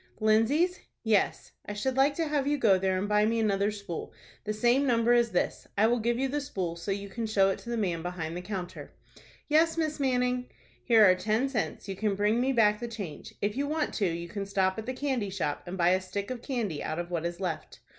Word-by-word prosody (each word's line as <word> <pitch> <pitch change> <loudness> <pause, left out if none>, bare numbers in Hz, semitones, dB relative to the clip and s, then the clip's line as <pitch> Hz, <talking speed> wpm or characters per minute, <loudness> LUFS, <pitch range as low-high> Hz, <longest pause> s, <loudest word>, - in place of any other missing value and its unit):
"Lindsay's?" 245 - +3 0.2
"Yes. 220 -3 +1 0.2
I 205 - -4
should 250 +5 -2
like 275 +2 +3
to 330 0 -1
have 290 -2 0
you 295 0 +2
go 200 -8 +4
there 190 0 +1
and 195 +2 -1
buy 210 0 +3
me 230 +2 +1
another 200 -2 +2
spool, 200 -5 -6 0.3
the 215 - -1
same 240 +6 +2
number 235 -1 +3
as 240 -1 +4
this. 180 - -1
I 210 - +5
will 240 +2 +2
give 235 +1 0
you 270 +2 +1
the 290 +2 -2
spool, 185 -10 -3
so 170 +3 -7
that 195 - +2
you 200 0 -7
can 225 +3 -4
show 195 -2 +3
it - - -4
to 235 - -10
the 235 - -1
man 180 -6 -1
behind 170 -2 -4
the 180 - -4
counter." 185 -2 -6 0.5
"Yes, 320 +2 +3
Miss 310 -2 -1
Manning." 250 -2 +1 0.4
"Here 225 -3 +6
are 185 - +7
ten 215 +8 0
cents. 220 -5 -3
You 195 - -4
can 205 +1 0
bring 210 +4 +2
me 265 +2 +2
back 210 -4 +3
the 240 - -4
change. 205 -9 -7
If 205 +1 0
you 280 +2 -1
want 305 0 -1
to, 200 - +1
you 170 0 -3
can 195 +3 -5
stop 190 0 +1
at 220 - -7
the 255 - -2
candy 255 -6 -1
shop, 175 -7 -2
and 180 +2 -5
buy 175 -1 +4
a 185 +1 +3
stick 200 +4 -5
of 250 -2 -5
candy 225 - -3
out 155 - -3
of 175 0 -4
what 170 -2 -1
is 170 +1 -3
left." 180 -5 -4
215 Hz, 245 wpm, -29 LUFS, 190-250 Hz, 0.5 s, are